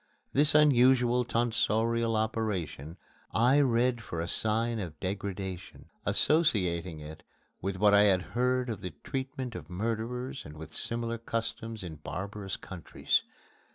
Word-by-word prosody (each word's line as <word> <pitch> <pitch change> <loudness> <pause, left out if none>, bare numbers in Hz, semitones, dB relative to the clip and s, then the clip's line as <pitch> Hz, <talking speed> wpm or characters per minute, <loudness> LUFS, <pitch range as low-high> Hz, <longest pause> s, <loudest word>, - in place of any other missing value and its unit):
This 150 +2 +5
unusual 125 -4 +5
tonsorial 115 -1 +1
operation 105 -8 -2 0.4
I 125 +5 +5
read 120 -2 +2
for 85 -5 -5
a 85 - -2
sign 115 +3 +1
of 85 -6 -6
degradation 95 -1 -5 0.2
associating 90 - +2
it 75 +1 -9 0.4
with 95 +1 -2
what 105 +2 +4
I 100 0 +7
had 95 -3 +3
heard 125 +1 +1
of 110 - -5
the 90 -4 -6
treatment 130 -2 -4
of 80 -6 -8
murderers 115 +7 -3
and 75 +1 -11
with 80 0 -9
similar 115 0 -2
customs 115 -1 -4
in 80 -4 -7
barbarous 100 +5 -5
countries. 90 -4 -1
110 Hz, 130 wpm, -30 LUFS, 90-120 Hz, 0.4 s, I